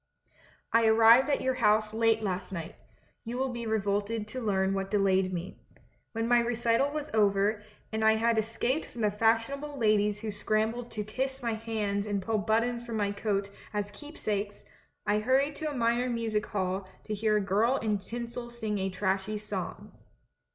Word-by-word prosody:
"I 230 0 +5
arrived 230 +5 +7
at 285 - +1
your 260 - +1
house 215 -3 +2
late 225 0 +2
last 185 -2 -3
night. 165 -3 -5 0.5
You 235 +1 -5
will 265 +1 0
be 235 -1 -4
revolted 210 0 -1
to 255 +3 -5
learn 195 -3 +1
what 195 0 -2
delayed 190 -2 +2
me. 180 +1 -5 0.5
When 225 0 -1
my 240 0 +5
recital 235 +2 +1
was 300 0 -5
over, 205 0 +2 0.3
and 220 0 -1
I 220 0 +6
had 230 0 +2
escaped 235 +7 -1
from 235 - -8
the 210 -1 +2
fashionable 230 +7 0
ladies 210 -3 +2
who 220 -1 -3
scrambled 220 +3 -1
to 210 - -4
kiss 265 +5 -3
my 230 -1 0
hands 215 -2 -2
and 205 -1 0
pull 215 +3 -1
buttons 230 +3 +1
from 230 -2 -4
my 205 -1 +1
coat 200 -1 -1 0.2
as 205 -1 -2
keep 295 +9 -11
sakes, 205 -1 -3 0.4
I 210 +1 +2
hurried 265 +6 +2
to 310 -1 -2
a 290 - -5
minor 240 +1 +1
music 225 -3 -1
hall 190 -1 -2
to 215 - -4
hear 215 0 +2
a - - +3
girl 210 +7 +2
in 210 -4 0
tinsel 240 +3 -6
sing 220 -4 -3
a 190 0 -1
trashy 190 +2 -1
song. 205 -3 -6
220 Hz, 180 wpm, -29 LUFS, 205-235 Hz, 0.5 s, arrived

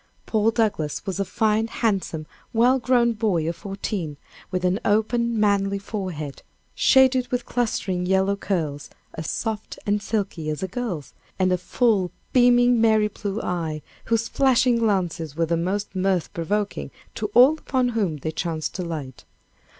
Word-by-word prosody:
Paul 220 0 +2
Douglass 210 -10 -1
was 190 0 -3
a - - +2
fine, 220 +1 +1
handsome, 195 -9 -1 0.3
well 245 +3 +4
grown 240 -1 +3
boy 200 -8 0
of 165 - -2
fourteen, 195 -6 -4 0.3
with 185 0 -2
an 180 +3 +2
open, 230 +2 +1
manly 200 -1 +2
forehead, 185 -8 -5 0.3
shaded 260 -2 +4
with 245 -1 -2
clustering, 190 -7 -1
yellow 190 +1 +2
curls, 160 -8 -3 0.2
as 160 - -5
soft 220 -2 -3
and 205 0 +1
silky 195 -8 -2
as 150 +4 -3
a - - -1
girl's, 190 - -4 0.2
and 185 -1 +2
a 180 - +3
full, 205 -3 +1 0.2
beaming, 245 -1 +5
merry 220 -2 +4
blue 205 0 -4
eye, 160 -4 -3 0.2
whose 230 0 +1
flashing 255 -1 +3
glances 175 -8 0
were 165 +1 +1
the 170 +1 0
most 190 +5 -2
mirth 185 -2 0
provoking 205 +5 -2 0.2
to - - -3
all 275 +6 +7
upon 255 -4 0
whom 200 -10 -1
they 155 +3 -4
chanced 160 -1 -3
to 185 - -4
light. 150 -7 -6
200 Hz, 155 wpm, -24 LUFS, 175-230 Hz, 0.3 s, all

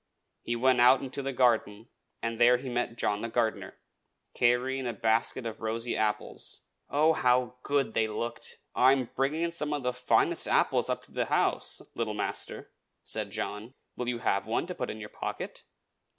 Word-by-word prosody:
He 120 - -2
went 125 +1 +3
out 125 +2 +7
into 135 +1 -4
the 135 0 -2
garden, 115 -4 +2 0.4
and 115 0 -2
there 125 +1 +7
he 130 +1 -6
met 120 -1 -2
John 105 -2 0
the 115 - -3
gardener, 115 -1 -1 0.6
carrying 125 +2 +2
a 120 - -2
basket 115 +2 0
of 115 -1 -5
rosy 115 +2 -2
apples. 105 0 -2 0.3
Oh! 155 +3 +4
how 125 -3 +2
good 140 -5 0
they 110 -1 +2
looked! 115 +2 -4 0.2
"I 130 +1 +6
am 130 -3 -1
bringing 155 +6 0
some 150 -3 0
of 145 -2 -2
the 125 0 0
finest 125 0 +2
apples - - +2
up - - -1
to - - -18
the - - -1
house, - - 0
little 110 -2 -2
master," 105 - -4 0.3
said - - -3
John. 110 +6 -5 0.2
"Will 125 -1 -2
you 120 - -1
have 100 -3 0
one 115 - 0
to 180 - -5
put 125 - -4
in 110 - -6
your 105 -1 -7
pocket?" - - -6
120 Hz, 180 wpm, -29 LUFS, 115-130 Hz, 0.6 s, out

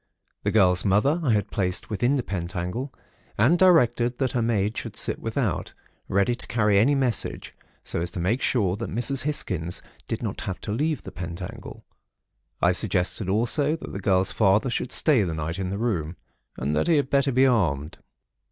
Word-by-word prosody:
The - - 0
girl's 90 -5 +4
mother 105 - +2
I 140 - 0
had 105 -1 -1
placed 90 -1 -2
within 120 +6 +1
the 130 - -1
pentacle 90 +6 -4 0.5
and 140 +12 +4
directed 125 -9 +4
that 130 -3 0
her 120 - 0
maid 110 -2 0
should - - -5
sit - - -1
without, - - -2 0.3
ready 100 +5 +2
to 120 - -8
carry 105 -4 +2
any 140 +7 +4
message, 130 -4 -1 0.3
so - - -3
as 85 - -2
to - - -4
make 105 +9 0
sure 100 -8 +1
that 115 - -5
Mrs. 125 +4 0
Hisgins 90 - -2 0.2
did - - -4
not - - -4
have 95 - -4
to 105 - -5
leave 150 +5 -1
the - - -8
pentacle. 90 +6 -8 0.8
I 90 - +5
suggested 90 +1 0
also, 125 +9 +2
that 165 - -9
the 100 - -4
girl's 95 -1 +2
father 110 +4 +2
should 125 - -2
stay 145 -8 +4
the 85 -5 -2
night 80 +3 -4
in 95 -1 -2
the 100 - -3
room, 90 -8 -2 0.4
and 70 +4 -1
that - - +1
he 170 - +4
had 145 -2 0
better 140 0 +3
be 130 +1 +4
armed. 85 - 0
105 Hz, 190 wpm, -25 LUFS, 90-125 Hz, 0.8 s, I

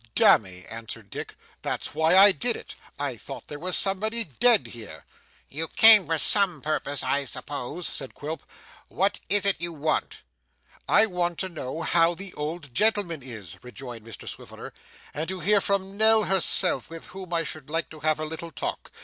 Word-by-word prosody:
'Damme!' 90 -3 +4
answered 115 0 -8
Dick, - - -7 0.3
'that's - - -4
why 160 +4 +3
I 200 +1 +9
did 235 +5 0
it. - - -9 0.2
I - - -3
thought - - -9
there 145 - -8
was 180 +2 +1
somebody 215 +4 0
dead 225 - +2
here.' 105 -10 -10 0.4
'You 160 +3 -5
came 215 -4 +7
for 165 0 0
some 190 -1 +6
purpose, 145 -2 -2
I 140 0 0
suppose,' 145 +5 -6
said 135 -3 -6
Quilp. 155 +3 -6 0.5
'What 195 +3 0
is 205 0 +2
it 200 -4 +1
you 170 0 -3
want?' 155 -1 -2 0.7
'I 215 +3 +6
want 175 -4 -2
to 190 - -3
know 155 -1 -6
how 170 0 +3
the 190 +1 -7
old 150 -2 -6
gentleman 205 - +1
is,' 110 -9 -10
rejoined 125 -2 -10
Mr 115 -1 -11
Swiveller, - - -9 0.4
'and 155 +2 -4
to 190 0 -4
hear 200 +4 +3
from 195 0 -2
Nell 220 0 +5
herself, 185 - +2
with 165 0 -10
whom 185 -1 -10
I 165 -1 0
should 155 -3 -8
like 165 +1 -3
to 155 - -11
have 155 0 0
a 155 - -3
little 160 +2 -7
talk. - - -5
165 Hz, 180 wpm, -25 LUFS, 145-195 Hz, 0.7 s, I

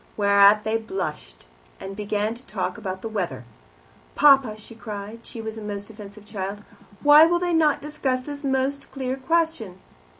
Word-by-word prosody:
Whereat 200 0 +5
they 220 +1 0
blushed, 155 - -6 0.3
and 195 0 -7
began 210 +1 -2
to 240 +2 -13
talk - - -3
about 190 -4 -6
the - - -3
weather. 175 - -4 0.7
"Papa" 270 -7 +5
she 215 +2 -13
cried 210 0 -7
she 230 - -7
was 220 0 -6
a - - -9
most 205 0 -6
offensive 210 -1 -12
child 205 -1 -5 0.4
"why 295 +2 +8
will 345 +1 +2
they 350 0 -1
not 310 -4 +2
discuss 280 -4 -2
this 285 +1 -8
most 270 +1 -1
clear 260 -1 -3
question?" 270 - -1
220 Hz, 165 wpm, -24 LUFS, 200-270 Hz, 0.7 s, why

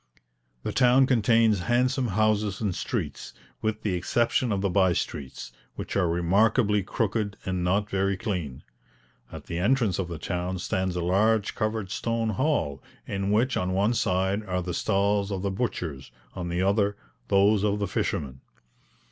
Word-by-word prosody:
The - - -2
town 130 +1 +5
contains 115 -4 +3
handsome 125 +6 +1
houses 105 -1 +1
and 105 -4 -1
streets, - - -4 0.3
with 110 0 -2
the 105 - 0
exception 115 +6 +1
of 100 -2 0
the 100 - +1
bye 95 -2 +3
streets, 70 -5 -5 0.2
which - - -6
are 90 -4 +2
remarkably 100 +5 +2
crooked 105 0 -2
and 95 -1 -1
not 100 +4 +1
very 95 -1 0
clean. 85 - -4 0.7
At - - -8
the 85 - -4
entrance 110 -1 +2
of 95 - -1
the 85 -2 -6
town 90 +3 -3
stands 95 0 -2
a 90 - -1
large 105 +4 +2
covered 110 -3 -2
stone 115 0 -1
hall, 105 - 0 0.2
in 100 0 -2
which 115 +6 +2
on 90 0 -1
one 100 +5 +2
side 95 -1 0
are 90 -1 -1
the 90 0 -4
stalls 100 +1 +1
of 95 -1 -3
the 100 - 0
butchers; 85 - -4 0.2
on 85 -2 -5
the 85 +2 0
other, 100 +1 +1 0.3
those 100 +1 +4
of 105 -1 +1
the 100 -1 -1
fishermen. 65 -6 -3
100 Hz, 165 wpm, -26 LUFS, 90-110 Hz, 0.7 s, town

